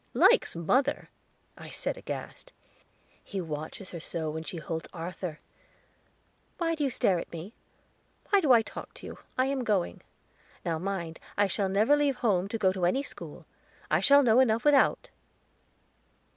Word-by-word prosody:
"Likes -, -, +5 dB
mother!" 255 Hz, -, +1 dB, 0.5 s
I -, -, -10 dB
said -, -, -2 dB
aghast. -, -, -7 dB, 0.7 s
"He 195 Hz, -, -5 dB
watches 160 Hz, +3 st, -6 dB
her 170 Hz, -, -6 dB
so 160 Hz, -1 st, -4 dB
when 160 Hz, +1 st, -4 dB
she 165 Hz, +2 st, -6 dB
holds 160 Hz, 0 st, -5 dB
Arthur! 170 Hz, -1 st, -5 dB, 1.2 s
Why 330 Hz, -2 st, 0 dB
do 310 Hz, -2 st, -2 dB
you 275 Hz, -, +2 dB
stare 190 Hz, -7 st, +2 dB
at -, -, -8 dB
me? 170 Hz, +6 st, -8 dB, 0.8 s
Why 400 Hz, -1 st, +5 dB
do 295 Hz, -6 st, +3 dB
I 230 Hz, -2 st, +7 dB
talk -, -, -9 dB
to -, -, -11 dB
you? -, -, -8 dB, 0.2 s
I 255 Hz, -, +3 dB
am 270 Hz, -1 st, -1 dB
going. 205 Hz, -6 st, 0 dB, 0.6 s
Now 165 Hz, -2 st, -1 dB
mind, 175 Hz, -3 st, -4 dB, 0.2 s
I 205 Hz, -, +4 dB
shall 195 Hz, 0 st, -1 dB
never 215 Hz, +9 st, +4 dB
leave 290 Hz, -2 st, +2 dB
home 195 Hz, -7 st, +1 dB
to 225 Hz, -, -3 dB
go 190 Hz, -3 st, +3 dB
to 180 Hz, -2 st, +1 dB
any 270 Hz, +10 st, +1 dB
school; -, -, -9 dB, 0.5 s
I -, -, +4 dB
shall 280 Hz, 0 st, +6 dB
know 235 Hz, -1 st, +5 dB
enough 235 Hz, -1 st, +3 dB
without." 290 Hz, -2 st, +4 dB
200 Hz, 165 wpm, -29 LUFS, 170-270 Hz, 1.2 s, I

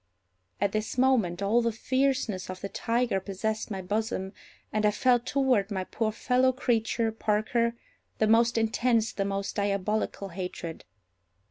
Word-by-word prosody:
At 200 Hz, 0 st, +1 dB
this 215 Hz, +3 st, -3 dB
moment 225 Hz, -9 st, +2 dB
all 220 Hz, +4 st, +3 dB
the 230 Hz, 0 st, +1 dB
fierceness 255 Hz, -5 st, 0 dB
of 185 Hz, 0 st, -6 dB
the 200 Hz, -, -4 dB
tiger 230 Hz, -3 st, 0 dB
possessed 215 Hz, +4 st, -3 dB
my 190 Hz, -3 st, -4 dB
bosom, 205 Hz, -1 st, -2 dB, 0.4 s
and 215 Hz, 0 st, +1 dB
I 210 Hz, -, +5 dB
felt 245 Hz, +3 st, +2 dB
toward 255 Hz, -7 st, +2 dB
my 190 Hz, -3 st, -2 dB
poor 220 Hz, +3 st, -2 dB
fellow 255 Hz, +3 st, +2 dB
creature, 230 Hz, -3 st, 0 dB
Parker, 225 Hz, +2 st, 0 dB, 0.4 s
the 220 Hz, -, +3 dB
most 230 Hz, +2 st, +4 dB
intense, 225 Hz, 0 st, +2 dB
the 195 Hz, -, -2 dB
most 195 Hz, +1 st, -3 dB
diabolical 200 Hz, 0 st, -1 dB
hatred. 175 Hz, -2 st, -6 dB
220 Hz, 145 wpm, -28 LUFS, 200-235 Hz, 0.4 s, I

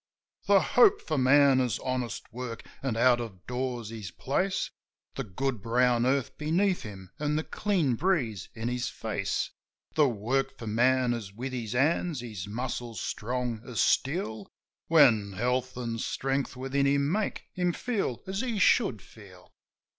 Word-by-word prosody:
The -, -, +7 dB
hope 420 Hz, -1 st, +5 dB
for 155 Hz, -4 st, -2 dB
man 135 Hz, +1 st, +5 dB
is 125 Hz, -4 st, 0 dB
honest 125 Hz, -4 st, -3 dB
work, 120 Hz, -1 st, -6 dB, 0.2 s
an' 130 Hz, -5 st, -2 dB
out 120 Hz, 0 st, +4 dB
o' 110 Hz, -6 st, -7 dB
doors 125 Hz, -3 st, -3 dB
his 110 Hz, -5 st, -6 dB
place, 185 Hz, -, -1 dB, 0.4 s
The 135 Hz, -, -3 dB
good 125 Hz, +2 st, -3 dB
brown 120 Hz, +2 st, +2 dB
earth 135 Hz, -1 st, 0 dB
beneath 175 Hz, +5 st, +1 dB
him 95 Hz, -3 st, -9 dB
an' 150 Hz, 0 st, 0 dB
the 155 Hz, -, 0 dB
clean 180 Hz, -11 st, 0 dB
breeze 120 Hz, -, 0 dB
in 115 Hz, +1 st, -3 dB
his 125 Hz, 0 st, -1 dB
face; -, -, -2 dB, 0.4 s
The 150 Hz, -3 st, +4 dB
work 135 Hz, +5 st, -1 dB
for 115 Hz, -, -8 dB
man 125 Hz, +3 st, +3 dB
is 110 Hz, -5 st, -5 dB
with 125 Hz, +6 st, -6 dB
his 115 Hz, -3 st, -4 dB
hands, 150 Hz, +2 st, +1 dB
his 105 Hz, -6 st, -6 dB
muscles 120 Hz, 0 st, -4 dB
strong 120 Hz, +1 st, -3 dB
as 125 Hz, -3 st, -5 dB
steel, 130 Hz, -, +1 dB, 0.4 s
When 120 Hz, -11 st, +5 dB
health 125 Hz, +4 st, -1 dB
an' 115 Hz, -2 st, -3 dB
strength 135 Hz, +3 st, -2 dB
within 135 Hz, +2 st, 0 dB
him 140 Hz, +1 st, +2 dB
make 210 Hz, +2 st, -1 dB
him 180 Hz, -1 st, +1 dB
feel 200 Hz, -, -2 dB
as 195 Hz, +2 st, -2 dB
he 240 Hz, -4 st, -2 dB
should 200 Hz, -, +3 dB
feel. 95 Hz, -5 st, -16 dB
125 Hz, 155 wpm, -28 LUFS, 115-140 Hz, 0.4 s, The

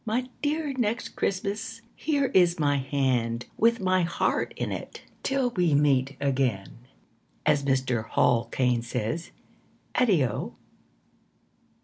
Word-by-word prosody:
My 245 Hz, +3 st, -1 dB
dear 300 Hz, 0 st, -1 dB
Next 235 Hz, -2 st, -1 dB
Christmas, 205 Hz, +4 st, -3 dB
Here 285 Hz, -4 st, 0 dB
is 175 Hz, -2 st, +4 dB
my 145 Hz, -2 st, +2 dB
hand, 125 Hz, -4 st, 0 dB
With 230 Hz, +1 st, +3 dB
my 185 Hz, -1 st, +2 dB
heart 170 Hz, 0 st, 0 dB
in -, -, -2 dB
it. -, -, -7 dB, 0.2 s
Till 270 Hz, -2 st, 0 dB
we 175 Hz, -8 st, +2 dB
meet 140 Hz, -2 st, +2 dB
again 130 Hz, -8 st, -1 dB, 0.7 s
As 145 Hz, -, +3 dB
Mr. 130 Hz, -4 st, 0 dB
Hall 115 Hz, -1 st, +3 dB
Caine 125 Hz, -2 st, +1 dB
says 120 Hz, +6 st, -3 dB, 0.6 s
Addio. 185 Hz, -, +1 dB
160 Hz, 115 wpm, -27 LUFS, -, 0.7 s, is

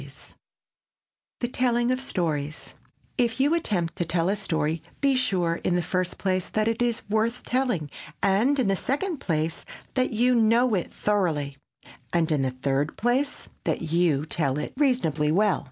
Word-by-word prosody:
[Sidenote: -, -, -11 dB, 1.2 s
THE 240 Hz, -, +1 dB
TELLING 245 Hz, -1 st, +1 dB
OF 255 Hz, 0 st, 0 dB
STORIES] 155 Hz, -, -2 dB, 0.5 s
If 235 Hz, 0 st, +1 dB
you 285 Hz, +4 st, +3 dB
attempt 185 Hz, -, 0 dB
to -, -, +1 dB
tell 165 Hz, +1 st, 0 dB
a 200 Hz, -, +2 dB
story, 160 Hz, -5 st, -1 dB, 0.2 s
be 275 Hz, -1 st, +3 dB
sure, 180 Hz, -9 st, +1 dB
in 175 Hz, -, +1 dB
the 175 Hz, -, +1 dB
first 185 Hz, +1 st, -1 dB
place, 185 Hz, -2 st, -1 dB
that 215 Hz, 0 st, 0 dB
it 230 Hz, +1 st, 0 dB
is 240 Hz, -2 st, 0 dB
worth 220 Hz, +3 st, 0 dB
telling, 245 Hz, -, 0 dB, 0.4 s
and 210 Hz, +9 st, +3 dB
in 255 Hz, -6 st, +2 dB
the 195 Hz, -, +3 dB
second 300 Hz, -, -1 dB
place, 160 Hz, -, -2 dB, 0.3 s
that 255 Hz, -1 st, +1 dB
you 245 Hz, +2 st, +2 dB
know 230 Hz, +1 st, +4 dB
it 180 Hz, -4 st, -1 dB
thoroughly, 160 Hz, -9 st, 0 dB, 0.6 s
and 170 Hz, -2 st, +1 dB
in 150 Hz, -3 st, +2 dB
the 130 Hz, -, +1 dB
third 135 Hz, +3 st, -1 dB
place, 260 Hz, +5 st, 0 dB, 0.2 s
that 160 Hz, -2 st, -1 dB
you 165 Hz, -4 st, +2 dB
tell 145 Hz, -4 st, 0 dB
it 150 Hz, -, -4 dB
reasonably 205 Hz, -, +2 dB
well. 200 Hz, +3 st, +3 dB
195 Hz, 170 wpm, -26 LUFS, 160-245 Hz, 1.2 s, know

